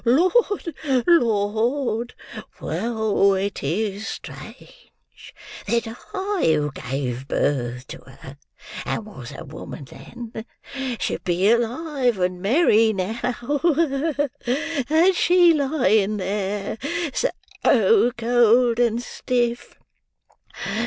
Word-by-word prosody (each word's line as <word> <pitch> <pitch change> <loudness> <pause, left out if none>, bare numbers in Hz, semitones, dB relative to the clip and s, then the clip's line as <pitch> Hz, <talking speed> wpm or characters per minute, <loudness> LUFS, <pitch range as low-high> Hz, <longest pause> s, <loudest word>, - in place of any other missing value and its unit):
"Lord, 360 - +2 0.3
Lord! 235 -2 +1 0.4
Well, 210 +2 +1
it 195 +1 -2
is 200 +7 -2
strange - - -10 0.8
that 235 0 +1
I 380 - -4
who 150 0 -1
gave 130 -1 -4
birth 125 -3 -1
to - - -8
her, 135 +1 -13 0.5
and 220 - -3
was 130 - -10
a - - -8
woman 140 0 -9
then, 220 - -9 0.6
should - - -2
be 185 +4 +2
alive 245 +1 0
and 180 -1 -1
merry 225 - +4
now, 200 +4 -3 1.7
and 335 +5 +5
she 350 -1 +5
lying 260 -8 +2
there: 200 +2 -3 0.3
so 450 - +2
cold 240 0 +3
and 235 0 +1
stiff! 240 -1 -2
225 Hz, 90 wpm, -23 LUFS, 190-255 Hz, 1.7 s, and